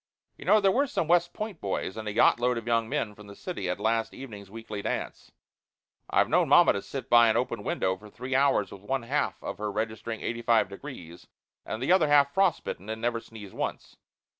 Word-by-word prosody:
You - - -12
know, 215 - +6
there 195 -2 +3
were 280 +7 +2
some 170 - -2
West 175 +1 +3
Point 210 -3 -6
boys 95 0 -3
and 110 -1 -6
a - - -1
yacht 115 +2 +4
load 125 0 +1
of 115 - -5
young 115 -1 +1
men 105 -2 -2
from 105 0 -14
the 100 - -11
city 100 - -5
at 90 - -2
last 115 0 0
evening's 105 -7 -9
weekly 110 -1 -7
dance. - - -4 0.8
I've - - +3
known - - +2
mamma - - +7
to 100 - -3
sit 135 +2 -7
by 120 -2 +6
an 110 - +2
open 120 -4 -2
window 95 -1 0
for 105 +3 -14
three 125 +5 -6
hours 140 +1 +2
with 100 - -10
one 130 +4 -2
half 140 +5 -1
of - - -5
her 105 -1 -2
registering 110 +1 -4
85 115 -3 +1
degrees 100 - -10 0.4
and 110 +3 -4
the 140 - +1
other 185 -4 +5
half 145 -1 +4
frostbitten, 175 - 0
and 110 0 -4
never 120 0 -1
sneeze 110 -4 -12
once. - - -5
115 Hz, 215 wpm, -28 LUFS, 105-140 Hz, 0.8 s, mamma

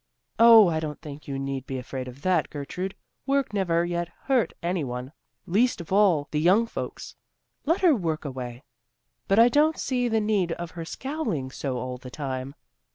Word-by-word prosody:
"Oh, 230 -3 +9
I 160 -2 0
don't 150 -2 -5
think 150 0 -10
you 140 -1 -3
need 135 -1 -4
be 135 - -3
afraid 130 0 -5
of 125 +3 -11
that, 180 -4 +2
Gertrude; 180 +7 -5 0.3
work 275 -4 +1
never 175 -4 +1
yet 175 0 -2 0.2
hurt 260 -5 +2
any 175 -1 0
one, 125 0 -5 0.3
least 225 +7 +2
of 170 +2 -6
all 185 -8 +4
the 150 - 0
young 190 +8 +4
folks. 230 - -6 0.5
Let 330 +4 +2
her 355 -4 +6
work 165 -7 -2
away. 125 -2 -6 0.6
But 195 - +2
I 230 +1 +8
don't 300 +5 +3
see 250 -2 0
the 225 -1 +2
need 205 -5 +1
of 170 0 -6
her 165 -2 -7
scowling 260 - -3
so 135 -2 -3
all 125 +1 -5
the 125 - -9
time. 135 0 -5
170 Hz, 185 wpm, -26 LUFS, 135-215 Hz, 0.6 s, Oh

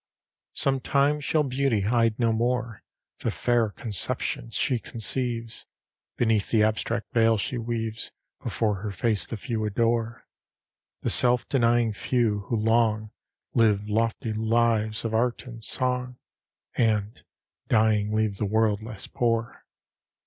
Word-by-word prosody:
LV - - -27
Sometime 140 +2 +2
shall 150 +1 +1
Beauty 130 -5 0
hide 115 +1 +2
no 115 -2 +2
more 120 -1 -1 0.4
The - - -1
fair 120 -2 +1
conceptions 115 +3 -3
she 130 -2 +1
conceives 115 0 -3 0.5
Beneath 110 -4 +1
the 110 -2 +3
abstract 110 +3 -1
veil 115 -2 +4
she 120 +5 -2
weaves 115 0 -3 0.3
Before 105 -4 -1
her 105 - -3
face 105 +2 0
the 115 - -5
few 110 0 -3
adore; 115 +2 0 0.8
The - - 0
self 125 0 +3
denying 120 -3 +2
few, 105 -3 0
who 120 - 0
long 110 -1 +1 0.4
Live 105 -3 +3
lofty 115 +1 0
lives 110 0 +1
of 115 - -2
art 120 +3 0
and 115 -3 -8
song, 125 0 0 0.6
And, 110 -2 0 0.4
dying, 110 -2 +2
leave 110 -2 0
the 105 - -1
world 110 0 +2
less 110 -2 -8
poor. 115 -1 -2
115 Hz, 130 wpm, -26 LUFS, 110-120 Hz, 0.8 s, veil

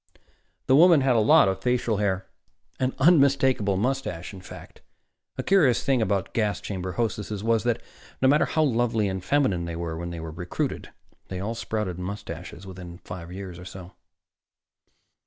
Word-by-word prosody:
The 130 - +4
woman 165 0 +7
had 130 -2 +3
a - - +4
lot 105 -2 +6
of 95 0 -1
facial 120 -2 0
hair 95 -2 -1 0.5
an 130 0 0
unmistakable 135 - +4
mustache, 105 -7 -2
in 95 - -10
fact. 90 - -12 0.6
A - - -2
curious 155 -12 +3
thing 135 -3 +2
about 100 -3 -1
gas 105 -4 0
chamber 95 -2 -5
hostesses 105 -3 -3
was 115 -1 +2
that, 120 -1 0 0.4
no 130 - +3
matter 145 +3 +4
how 155 - +1
lovely 115 -5 +1
and 95 -1 -4
feminine 100 -7 +1
they 85 -1 -5
were 85 -1 -4
when 85 +1 -5
recruited, 80 +2 -4 0.4
they 95 - -5
all 105 +4 -3
sprouted 105 -6 -3
mustaches 90 -2 -7
within 90 -2 -9
five 90 -2 -9
years 95 -2 -7
or 90 - -10
so. 90 0 -10
100 Hz, 160 wpm, -25 LUFS, 90-125 Hz, 0.6 s, woman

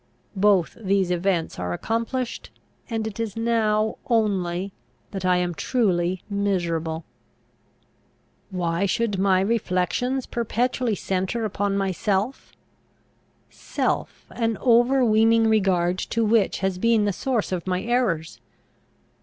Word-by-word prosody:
Both 195 -2 +2
these 195 -3 +1
events 175 - 0
are 90 0 -2
accomplished; 230 - -3 0.4
and 225 -2 -2
it 220 -1 -6
is 225 -2 -3
now 220 -2 +1
only 195 -5 0 0.4
that 195 -2 -4
I 180 -1 +4
am 175 -1 -1
truly 180 - 0
miserable. 170 -5 -1 1.4
Why 180 0 -1
should 205 -1 0
my 190 -1 +3
reflections 230 +5 0
perpetually 240 0 -1
centre 190 +5 -2
upon 200 -1 -1
myself? 195 +4 -1 1.0
self, - - -3
an 225 -3 -1
overweening 230 -2 +4
regard 185 -4 +2
to 230 -1 -1
which 215 -4 +2
has 190 -1 -1
been 230 0 +3
the 205 - 0
source 240 -1 -1
of 180 -1 -3
my 180 0 -1
errors! 225 -10 -1
200 Hz, 110 wpm, -24 LUFS, 185-230 Hz, 1.4 s, I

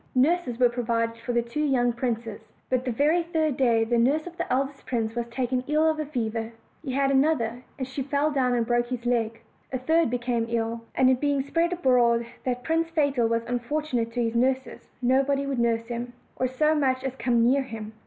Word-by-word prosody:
Nurses 265 -2 +2
were 250 0 +5
provided 230 -1 -1
for 240 +2 -4
the 235 -1 +1
two 235 +6 -3
young 245 -4 +2
princes; 230 -3 -3 0.3
but 255 0 +1
the 250 - 0
very 300 +8 +2
third 320 -4 0
day 235 -4 +3
the 235 +1 +1
nurse 285 +6 +2
of 350 -1 -9
the - - -4
eldest 270 +2 -1
prince 225 -3 -1
was 235 0 -3
taken 250 +1 -1
ill 305 +2 +3
of 315 -1 +1
a 305 - -1
fever; 225 -4 -3 0.3
he 265 -4 -4
had 275 0 +2
another, 265 -4 +1 0.2
and 260 -3 -3
she 270 +1 -5
fell 285 +3 0
down 255 -3 +1
and 235 -1 +1
broke 240 +1 +1
his 245 -1 -5
leg; 230 -2 0 0.3
a 260 - -1
third 320 +4 +2
became 240 -1 -1
ill, 230 0 -1
and 260 0 +5
it 255 - 0
being 285 -2 +1
spread 335 +5 0
abroad 245 -8 +3 0.2
that 250 -1 -2
Prince 330 +2 0
Fatal 285 -7 +1
was 230 0 0
unfortunate 245 0 -2
to 240 0 0
his 230 0 -1
nurses, 260 +2 -1
nobody 275 +2 +2
would 275 -3 -2
nurse 230 -1 +1
him, 240 +1 -5 0.2
or 255 - 0
so 305 +5 +2
much 265 -4 +1
as 265 -1 -3
come 235 -1 +2
near 265 +4 +4
him. 220 -4 -7
250 Hz, 215 wpm, -26 LUFS, 235-280 Hz, 0.3 s, were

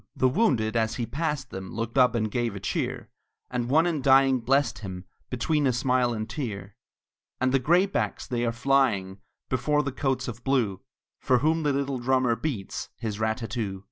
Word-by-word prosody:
The 130 - +3
wounded 125 - +1
as 110 0 +1
he 120 - -2
passed 145 -2 -3
them 95 0 -7
Looked 115 0 -3
up 125 -3 +4
and 110 -2 0
gave 120 -3 -1
a - - -5
cheer; 100 - -3 0.4
And 125 -1 -2
one 160 +5 +4
in 165 -5 0
dying 135 0 +5
blessed 125 -4 +1
him, 95 -3 -7 0.2
Between 145 +4 +1
a - - +3
smile 125 0 +1
and 110 -1 -3
tear. 105 -6 -5 0.6
And 130 0 +2
the 135 - +3
graybacks 175 +8 +1
they 120 -1 -2
are 115 - +1
flying 120 -7 +1 0.3
Before 150 +4 +1
the 140 - -2
coats 135 0 -1
of 120 0 -7
blue, 115 -9 0 0.4
For 125 - +3
whom 160 +5 +1
the 150 -2 +1
little 140 -1 -1
drummer 130 -1 +2
beats 115 -9 -4
His 110 -2 -4
rat 110 0 0
tat 115 -2 -6
too. 105 -6 -3
125 Hz, 190 wpm, -26 LUFS, 110-135 Hz, 0.6 s, dying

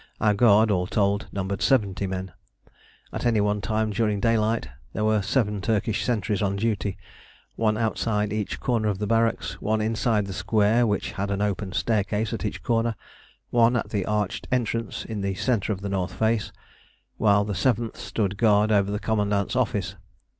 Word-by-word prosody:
Our 105 -1 +3
guard, 110 0 +5
all 90 -2 +1
told, 100 0 0
numbered 100 0 -3
70 100 -7 +2
men. 95 -1 -4 0.8
At - - -4
any 115 -3 +2
one 105 0 +1
time 110 +1 0
during 105 -1 0
daylight 110 - +1 0.3
there 105 - -2
were 110 -1 +3
seven 105 -1 0
Turkish 110 +1 0
sentries 110 -3 -1
on 100 -1 0
duty: 100 -2 -1 0.6
one 110 -1 +1
outside 105 -2 0
each 105 -2 -3
corner 115 -4 0
of 100 -3 0
the 105 - -2
barracks, 115 -5 0
one 110 +1 0
inside 110 -1 +1
the 95 - -6
square 105 +4 +2
which 105 -2 -1
had 100 0 -3
an 100 +1 -1
open 100 -1 -2
staircase 105 +3 0
at 110 -2 -3
each 105 - -4
corner, 115 -1 +1 0.6
one 120 0 +4
at 120 - -2
the 100 -3 0
arched 105 0 -1
entrance 115 -3 -1
in 110 -3 -4
the 100 -1 -1
centre 115 0 0
of 100 -2 -3
the 100 - -4
north 95 -2 -2
face, 110 -1 0 0.7
while 100 -1 +3
the 105 - -3
seventh 115 +3 0
stood 100 -3 -2
guard 105 -1 +3
over 100 -2 +3
the 105 - -1
commandant's 105 -2 0
office. - - -1
105 Hz, 175 wpm, -25 LUFS, 100-115 Hz, 0.8 s, guard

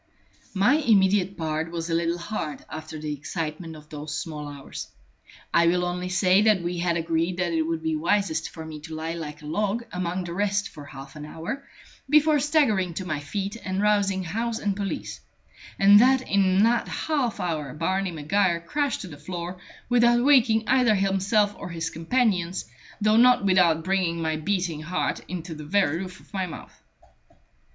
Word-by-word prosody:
My 205 +10 +4
immediate 195 - +3
part 160 -1 -2
was 165 -1 -4
a 165 - -2
little 170 +1 +1
hard 170 -4 -5
after 155 +1 -7
the 150 -1 -4
excitement 160 +2 -5
of 150 0 -14
those 150 0 -5
small 150 -3 -5
hours. 140 -1 -8 0.7
I 170 0 +5
will 180 +1 +2
only 180 +1 -3
say 185 +1 +4
that 210 -4 +3
we 175 0 -2
had 170 -1 +1
agreed 165 +2 -1
that 175 -2 0
it 165 - +2
would 160 0 -2
be 160 -1 0
wisest 165 0 0
for 160 -1 -9
me 155 -1 -8
to 160 +1 -8
lie 160 +1 -3
like 150 -2 -7
a - - -9
log 210 +8 -1
among 180 0 -2
the 170 -1 -6
rest 200 +1 0
for 145 - -11
half 135 0 -11
an 150 - -8
hour, 175 - -6 0.4
before 300 0 +5
staggering 255 - +2
to 185 - -4
my 155 -4 -2
feet 195 +8 -4
and 190 0 -2
rousing 200 -2 +2
house 225 +6 -2
and 205 -3 -1
police; 200 -1 -4 0.6
and 200 +1 +7
that 260 +1 +4
in 195 0 +3
that 235 +1 +2
half 280 -8 -1
hour 155 -6 -2
Barney 190 +4 0
Maguire 170 +3 +1
crashed 285 - -2
to 190 - -7
the 150 -4 -10
floor, 175 +3 -6 0.3
without 240 0 +4
waking 235 -6 +4
either 250 -4 +4
himself 195 +2 +2
or - - -6
his 165 -1 -3
companions, 180 -1 0 0.3
though 215 +1 +3
not 245 -3 +5
without 175 -4 +4
bringing 185 -2 0
my 160 -1 -1
beating 170 -1 -1
heart 170 +4 -2
into 175 -1 -5
the 155 -1 -8
very 165 -1 +1
roof 185 0 -7
of - - -22
my 190 -2 -1
mouth. 160 - -11
180 Hz, 180 wpm, -25 LUFS, 160-205 Hz, 0.7 s, and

